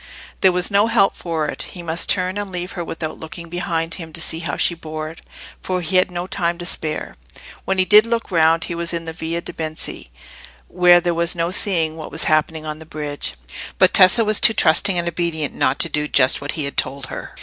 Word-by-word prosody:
There 190 - +4
was 180 +2 +2
no 200 +2 +3
help 195 -3 +2
for 165 -3 -3
it; - - -5 0.2
he 175 - -7
must 165 0 -2
turn 185 +1 +1
and 205 -2 -6
leave 180 0 -4
her 175 - -5
without 160 -1 -6
looking 165 +1 -9
behind 165 -1 -3
him 165 -3 -7
to 170 - -2
see 160 0 -1
how 170 - -4
she - - +3
bore 155 -1 -7
it, 165 - -15 0.4
for 185 -1 -3
he 180 +2 0
had 185 - +2
no 175 0 -5
time 170 -2 -2
to 175 - -8
spare. 155 - -3 0.5
When 190 - -1
he 185 - +3
did 210 +3 +6
look 230 -2 -3
round 165 -1 +3
he 175 - -5
was 170 0 -2
in 165 0 -5
the 160 - -6
Via 165 +1 -4
de' - - -9
Benci, 155 - -4 0.6
where 175 -1 +4
there 175 0 -1
was 170 +1 +2
no 170 0 -2
seeing 165 -5 +3
what 155 - -8
was 160 - +2
happening 155 0 0
on 155 0 -6
the - - -10
bridge; 150 -2 -4 0.4
but - - +4
Tessa 220 +5 +6
was 215 0 +3
too 225 - +7
trusting 180 +3 +4
and 170 0 -1
obedient 165 -3 -2
not 130 - 0
to - - +2
do 150 0 -2
just 130 -3 +3
what 145 - -5
he 155 - -3
had 140 - -7
told 135 +1 0
her. - - -9
170 Hz, 235 wpm, -19 LUFS, 160-180 Hz, 0.6 s, too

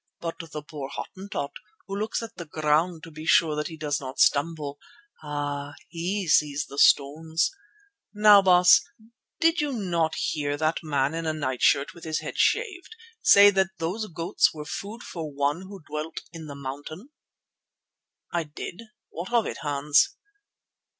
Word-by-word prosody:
But 165 -1 -5
the 155 -3 -7
poor 145 -3 -7
Hottentot, 190 -6 -5 0.3
who 195 - -5
looks 215 +3 -2
at 230 0 -9
the 175 - -7
ground 155 +2 +1
to 165 - -10
be 155 +1 -9
sure 160 -2 +4
that 150 0 -2
he 160 - -9
does 150 -2 -1
not 130 0 -7
stumble, 145 -1 +1 0.4
ah! 145 -1 -4
he 185 +3 -3
sees 150 -2 +2
the 140 - -7
stones. 160 +4 +3 0.6
Now, 210 -1 +7
Baas, 180 -1 +6 0.6
did 330 -1 +3
you 295 -1 -1
not 170 -8 0
hear 145 -2 -1
that 155 +1 0
man 145 -2 0
in 165 0 -3
a 155 - 0
night 130 -5 -3
shirt 140 0 +3
with 170 - -14
his 155 -1 -2
head - - -6
shaved 405 -3 0 0.3
say 200 0 +8
that 190 -1 0
those 185 +7 -3
goats 165 -1 +1
were 150 -1 -8
food 210 +9 -6
for 160 -4 -6
One 145 +6 -1
who 195 -4 -11
dwelt 150 +2 -5
in 160 -2 -8
the 140 - -8
mountain?" 145 - -7 1.2
"I 170 -2 0
did. 155 +6 -8 0.3
What 175 +6 -7
of 235 -2 +3
it, - - -4
Hans?" 145 0 +2
160 Hz, 165 wpm, -26 LUFS, 145-185 Hz, 1.2 s, say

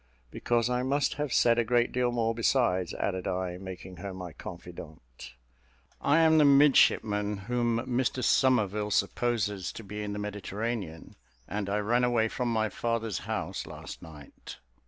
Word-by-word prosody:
"Because 120 -1 0
I 125 0 0
must 140 +3 +1
have 150 -3 -2
said 120 0 +4
a - - +3
great 120 +1 +2
deal 125 -1 +1
more; 115 -1 0
besides," 115 -7 +1
added 95 -1 -2
I, 90 -1 -3
making 95 -1 -9
her 95 +2 -6
my 90 -3 -7
confidante. 75 -8 -11 0.7
"I 145 +3 +3
am 160 -1 +5
the - - +6
midshipman 110 -7 +4
whom 120 +3 -1
Mr 125 +1 -1
Somerville 105 -6 +2
supposes 105 -3 0
to 115 - -9
be 105 +1 -6
in 105 -1 -4
the - - -5
Mediterranean, 105 -3 -5 0.3
and 100 -1 -3
I 100 - 0
ran 115 +4 +1
away 120 -2 +2
from 125 0 -2
my 110 -1 +1
father's 115 -4 -2
house - - -3
last - - -9
night." 75 -4 -12
110 Hz, 155 wpm, -29 LUFS, 95-120 Hz, 0.7 s, the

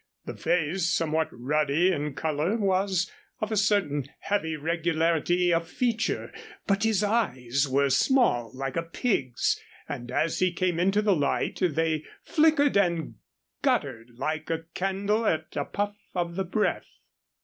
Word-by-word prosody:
The - - -5
face, 175 +1 0
somewhat 160 -2 +1
ruddy 150 +7 +1
in 150 -4 -2
color, 160 - 0
was 190 -3 +1 0.3
of 215 +1 -3
a - - +1
certain 195 -9 +1
heavy 160 -6 -1
regularity 165 +2 +1
of 165 0 0
feature, 230 -1 -1 0.3
but 200 0 +1
his 220 -2 +2
eyes 140 - +1
were 140 +1 +2
small, 140 - +3
like 135 0 -3
a 165 - +1
pig's, 165 - -1 0.3
and 120 0 -6
as 155 +5 0
he 185 -1 +3
came 175 -1 0
into 195 +4 +2
the 205 -3 +4
light 145 -3 0
they 160 -2 +1 0.2
flickered 305 -4 +3
and 170 -5 +1 0.5
guttered 135 - -1
like 155 +3 -3
a 165 0 -1
candle 200 +4 0
at 160 0 -1
a - - -1
puff 205 0 -2 0.2
of 170 -1 -1
the 190 0 -1
breath. 210 +4 -1
170 Hz, 145 wpm, -27 LUFS, 150-200 Hz, 0.5 s, the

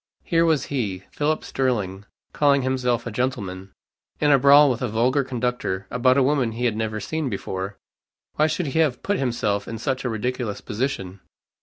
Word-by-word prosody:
Here 165 -1 +2
was 155 -5 +2
he, 100 -8 -2
Philip 155 +1 -1
Sterling, 105 -7 -2 0.3
calling 140 -2 +3
himself 125 -3 0
a 120 - -4
gentleman, 100 -6 -3 0.5
in 150 -1 +3
a 140 - +6
brawl 140 +2 +7
with 120 - -3
a 125 - 0
vulgar 125 +6 +2
conductor, 125 -7 -2
about 130 +1 +3
a 140 - +5
woman 130 -4 +1
he 120 +2 -2
had 115 -3 +1
never 110 -1 -2
seen 160 +3 -3
before. 95 -1 -4 0.6
Why 155 - +3
should 170 +2 -1
he - - +1
have 150 -6 +1
put 205 0 0
himself 105 -6 -1
in 115 - -5
such 130 +3 -2
a 125 - -1
ridiculous 115 -1 -3
position? 105 -5 -3
125 Hz, 180 wpm, -23 LUFS, 105-140 Hz, 0.6 s, brawl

